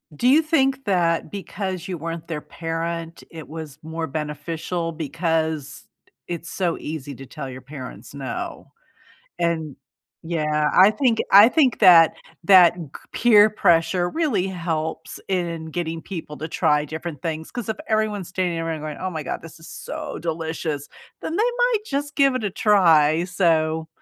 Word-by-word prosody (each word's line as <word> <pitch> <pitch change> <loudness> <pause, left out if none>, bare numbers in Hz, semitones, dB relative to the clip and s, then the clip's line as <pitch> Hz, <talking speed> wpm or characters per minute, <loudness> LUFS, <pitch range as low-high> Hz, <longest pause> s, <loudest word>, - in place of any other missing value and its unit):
Do 245 - +1
you 285 +5 +6
think 270 -4 +1
that 170 -5 +1
because 190 -2 -5
you 180 - -4
weren't 165 +1 -6
their 155 -3 -4
parent, 165 +1 -5
it 160 -2 -9
was 155 -2 -8
more 160 +1 -4
beneficial 160 +3 -4
because 160 -1 -2 0.4
it's 170 -1 -5
so 175 -3 -1
easy 145 -3 -6
to 135 - -10
tell 130 +1 -7
your 130 0 -9
parents 135 -1 -10
no, 135 -3 -6 0.7
and 165 -4 -1 0.5
Yeah, 150 -2 0
I 190 +3 +8
think 245 -4 +1
I 205 +4 +10
think 275 -6 +2
that 170 -5 +8 0.3
that 180 -2 +7
g 160 -5 -9
peer 215 -3 +6
pressure 175 -3 +2
really 255 - 0
helps 165 -4 -4
in 170 -4 -2
getting 165 0 -4
people 160 -4 -7
to 155 - -4
try 150 0 +2
different 155 -1 -6
things, 160 -1 -4
'cause 240 -3 -6
if 220 - -1
everyone's 215 -4 0
standing 180 -2 -1
around 165 -2 -3
going, 150 -1 -6
"Oh 185 - -2
my 160 -4 -5
God, - - -4
this 165 0 -12
is 160 - -14
so - - -6
delicious," 160 -3 -3 0.3
then 320 - -3
they 420 - +2
might 485 -2 +1
just 290 -3 -3
give 275 -2 +3
it 240 - -3
a 205 - 0
try, 170 -6 +4
so, 160 -3 +1
165 Hz, 160 wpm, -23 LUFS, 155-195 Hz, 0.7 s, I